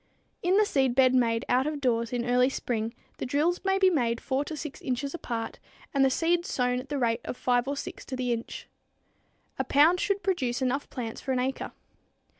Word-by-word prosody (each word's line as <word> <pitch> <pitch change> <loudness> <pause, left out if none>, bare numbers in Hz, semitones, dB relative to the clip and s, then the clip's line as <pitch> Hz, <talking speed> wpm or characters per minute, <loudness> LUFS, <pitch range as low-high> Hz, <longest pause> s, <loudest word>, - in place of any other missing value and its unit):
In 365 +2 +3
the 425 - +5
seedbed 265 -5 +3
made 230 -3 +2
out 255 +3 +2
of 305 -1 -2
doors 235 -4 0
in 240 -1 -1
early 250 +1 +3
spring, 230 -3 -3 0.2
the - - -2
drills 305 +6 +1
may 385 0 +2
be 380 -1 +5
made 235 -7 +1
4 270 +1 -1
to 310 - -6
6 300 -1 -7
inches 270 +2 -2
apart 230 -9 -4 0.3
and 275 -1 +3
the 270 - +5
seeds 340 +5 +1
sown 250 -1 +1
at 265 +2 -9
the 290 - -1
rate 235 -2 +1
of - - -5
5 245 0 +1
or 280 +1 -2
6 - - -6
to 260 - -5
the 250 -1 0
inch. 230 0 -6 0.9
A - - +2
pound 315 +6 +4
should 400 +1 0
produce 260 -11 0
enough 265 +2 -1
plants 230 -4 -5
for 265 - -1
an 255 - +1
acre. 265 +1 -2
260 Hz, 210 wpm, -28 LUFS, 245-295 Hz, 0.9 s, the